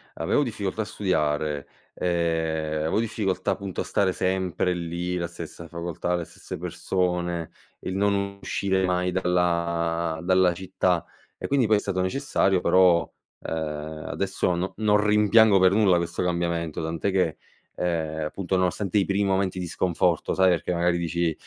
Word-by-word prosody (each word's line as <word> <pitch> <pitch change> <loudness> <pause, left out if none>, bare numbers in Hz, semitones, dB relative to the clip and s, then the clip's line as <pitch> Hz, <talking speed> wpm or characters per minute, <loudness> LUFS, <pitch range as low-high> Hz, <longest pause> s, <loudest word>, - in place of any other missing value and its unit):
avevo 145 - +1
difficoltà 110 -3 -3
a - - -2
studiare, 75 -7 -1 0.3
ehm, 80 -3 -1
avevo 80 +7 0
difficoltà 110 -4 -1
appunto 100 -2 -4
a - - +1
stare 95 -2 +1
sempre 90 -1 0
lì, 85 +1 -3
la 85 -1 -2
stessa 85 0 -9
facoltà, 85 +1 -3
le 85 -2 -3
stesse - - -9
persone; 90 -2 -2 0.3
il 95 - -5
non 100 0 0
uscire 95 -1 0
mai 90 0 0
dalla 85 -2 0
dalla 95 -1 +4
città, 90 -1 0 0.3
e - - -5
quindi 135 -5 +2
poi 105 -1 +4
è - - +1
stato 95 -2 -2
necessario 95 -3 +1
però, 90 -2 +4 0.3
uhm, 75 -1 -4
adesso 95 -2 -1
no 90 +2 -3
non 105 -1 +3
rimpiango 105 0 +5
per 95 0 +5
nulla 100 -3 +4
questo 85 0 -1
cambiamento, 85 -3 -1
tant'è 80 +4 -1
che, 90 -5 +1 0.4
ehm, 80 -3 -1
appunto 95 +3 -2
nonostante 95 +2 0
i 100 - +3
primi 100 +1 +1
momenti 95 -1 0
di 90 -1 -3
sconforto, 85 -1 0
sai, 95 0 +4
perché 90 +1 0
magari 85 0 +1
dici: 85 -1 0
90 Hz, 155 wpm, -25 LUFS, 85-95 Hz, 0.4 s, rimpiango